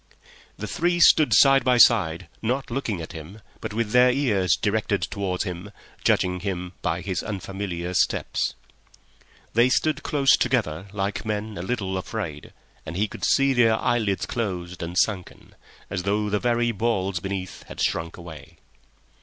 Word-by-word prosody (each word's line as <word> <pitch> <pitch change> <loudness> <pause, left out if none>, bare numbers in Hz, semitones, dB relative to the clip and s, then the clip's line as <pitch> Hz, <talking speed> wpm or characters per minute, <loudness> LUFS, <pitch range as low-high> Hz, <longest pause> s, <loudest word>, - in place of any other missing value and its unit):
The 105 - -5
three 175 - 0
stood 155 -2 +6
side 135 -2 +6
by 125 0 +3
side, 85 -10 +4
not 125 +3 -2
looking 115 -8 -2
at - - -8
him, 85 +5 -10 0.2
but - - -5
with 110 0 -2
their 125 +1 +6
ears 105 - +2
directed 105 -1 0
towards 95 -3 -2
him, 90 +1 -6 0.3
judging 90 0 +2
him 90 -2 -4
by 85 +1 -1
his 95 -2 -2
unfamiliar 95 -3 -5
steps. 90 - 0 1.0
They 120 +3 +4
stood 155 +3 +1
close 140 -3 +3
together 100 -9 -1
like 100 0 -3
men 110 0 -3
a 85 - -5
little 95 -2 -2
afraid, 90 -7 -6 0.3
and 85 +2 -6
he 105 +2 +1
could - - -10
see 135 0 +3
their 115 -3 +4
eyelids 105 -5 0
closed 90 -6 -4
and 85 +1 -5
sunken, 95 -2 -1 0.3
as 100 -2 -3
though 105 +2 -1
the 105 - +1
very 120 0 +1
balls 100 -4 -1
beneath 95 0 -5
had - - -10
shrunk 85 0 -1
away. 85 -3 -11
100 Hz, 155 wpm, -24 LUFS, 90-120 Hz, 1.0 s, stood